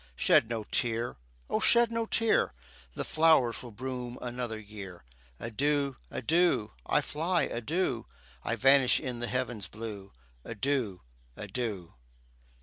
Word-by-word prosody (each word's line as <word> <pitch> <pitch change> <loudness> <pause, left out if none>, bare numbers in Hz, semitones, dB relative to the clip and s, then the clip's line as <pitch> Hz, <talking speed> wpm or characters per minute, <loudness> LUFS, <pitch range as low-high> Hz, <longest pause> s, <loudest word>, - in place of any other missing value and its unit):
Shed 110 - +4
no 115 -2 -2
tear! 115 +2 -1 0.3
O - - 0
shed 235 -1 +5
no 230 0 -1
tear! 225 - +2 0.4
The - - -2
flowers 155 -7 +4
will 125 - -8
bloom 125 +1 -5
another 120 -2 -4
year. 100 -5 -9 0.4
Adieu, 140 +4 0
adieu 155 -5 +2 0.2
I - - +3
fly, 170 +4 0
adieu, 155 - -1 0.4
I - - 0
vanish 135 -1 +5
in 125 -4 -4
the 120 - -2
heaven's 125 -4 -2
blue 105 -3 -7 0.3
Adieu, 115 -4 -1 0.4
adieu! 105 -9 -4
125 Hz, 125 wpm, -30 LUFS, 110-145 Hz, 0.4 s, shed